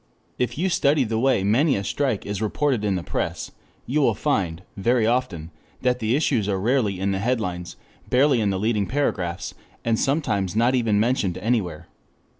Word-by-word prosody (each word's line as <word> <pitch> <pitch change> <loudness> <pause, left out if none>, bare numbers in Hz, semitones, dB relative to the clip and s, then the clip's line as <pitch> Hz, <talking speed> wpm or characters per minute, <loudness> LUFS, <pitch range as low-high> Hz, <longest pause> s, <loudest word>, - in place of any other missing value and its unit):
_] - - -41 0.4
If 125 0 -1
you 180 +5 +1
study 145 -5 +2
the 110 -1 -1
way 130 -5 +2
many 130 +9 +3
a 100 - -2
strike 130 0 -1
is 100 0 -4
reported 120 +2 0
in 100 -2 +1
the 90 - -3
press, - - -3 0.3
you 150 +4 0
will 135 - +3
find, 95 - -1
very 115 +3 +2
often, 110 -10 -1 0.3
that 125 0 +2
the 110 +1 +1
issues 125 -8 +1
are 95 -1 0
rarely 110 -3 +1
in 100 +1 0
the 95 - -1
headlines, 95 -6 -2 0.3
barely 130 -1 +3
in 105 - +1
the 95 - 0
leading 105 -2 0
paragraphs, 95 -10 -2 0.3
and 115 -1 +1
sometimes 105 - 0
not 120 +3 +3
even 115 -5 +2
mentioned 110 -6 +1
anywhere. 95 -8 -1
110 Hz, 185 wpm, -23 LUFS, 100-130 Hz, 0.4 s, many